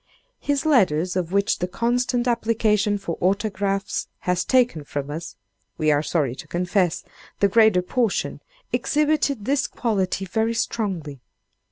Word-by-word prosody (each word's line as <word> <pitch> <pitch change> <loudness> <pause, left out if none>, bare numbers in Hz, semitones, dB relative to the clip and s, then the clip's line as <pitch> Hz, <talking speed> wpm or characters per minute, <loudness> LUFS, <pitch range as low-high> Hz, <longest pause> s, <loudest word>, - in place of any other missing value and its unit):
His 285 +1 -1
letters, 185 - +3
of 180 -2 -1
which 200 +1 +1
the 180 - -1
constant 240 +5 0
application 220 -3 +1
for 195 -5 -5
autographs 195 +1 0
has 180 0 0
taken 245 - +2
from 145 0 -5
us, 165 +3 -6 0.4
we 155 -1 +2
are 145 0 +3
sorry 150 -5 0
to - - -9
confess, 180 0 0 0.4
the 200 - +5
greater 215 -3 +4
portion, 230 +2 -1 0.3
exhibited 295 -6 +1
this 280 +2 +1
quality 195 -5 -1
very 220 +4 0
strongly. 185 - -3
200 Hz, 135 wpm, -23 LUFS, 180-235 Hz, 0.4 s, the